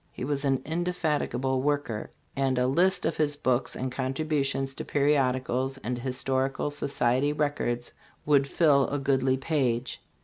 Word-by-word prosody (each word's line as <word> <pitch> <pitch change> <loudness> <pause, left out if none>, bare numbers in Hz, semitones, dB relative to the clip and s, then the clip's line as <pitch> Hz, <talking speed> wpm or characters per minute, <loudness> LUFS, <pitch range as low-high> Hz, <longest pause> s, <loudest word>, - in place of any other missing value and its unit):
He - - -5
was 140 0 -2
an 135 -1 +1
indefatigable 155 -6 -1
worker, 145 -6 -1 0.3
and 135 -2 +1
a 125 - +2
list 180 +8 +2
of - - -1
his 150 -2 +1
books 130 -3 0
and 130 0 -3
contribu 140 +3 -1
tions 135 0 -2
to - - -6
periodicals 135 -2 +1
and 125 -1 -4
historical 130 +2 -1
society 140 -1 0
records 145 -5 -1 0.3
would 140 -2 +4
fill 140 -3 +3
a 145 - -2
goodly 135 -1 +1
page. 130 -4 -1
135 Hz, 145 wpm, -27 LUFS, 130-145 Hz, 0.3 s, would